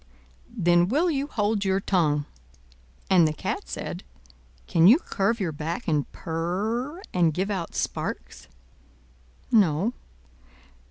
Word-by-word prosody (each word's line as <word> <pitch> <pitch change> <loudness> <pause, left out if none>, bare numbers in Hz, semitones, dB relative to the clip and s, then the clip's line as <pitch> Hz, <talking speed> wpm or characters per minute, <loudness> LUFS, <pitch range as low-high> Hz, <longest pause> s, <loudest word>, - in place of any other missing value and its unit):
"Then 175 -6 +3
will 310 - +2
you 280 -1 -1
hold 210 -5 0
your 190 0 +1
tongue!" 155 -7 +1 0.8
And 175 -4 +5
the 155 - -1
Cat - - -4
said, - - -5 0.6
"Can 165 +1 +4
you 235 +8 +8
curve 230 - -1
your 180 -5 -1
back, 160 +10 -5
and 150 -4 0
purr, 215 - -3
and 170 -4 +2
give 195 +3 -1
out 180 -5 -4
sparks?" - - -4 1.0
"No." 200 0 +3
190 Hz, 120 wpm, -25 LUFS, 165-230 Hz, 1.0 s, you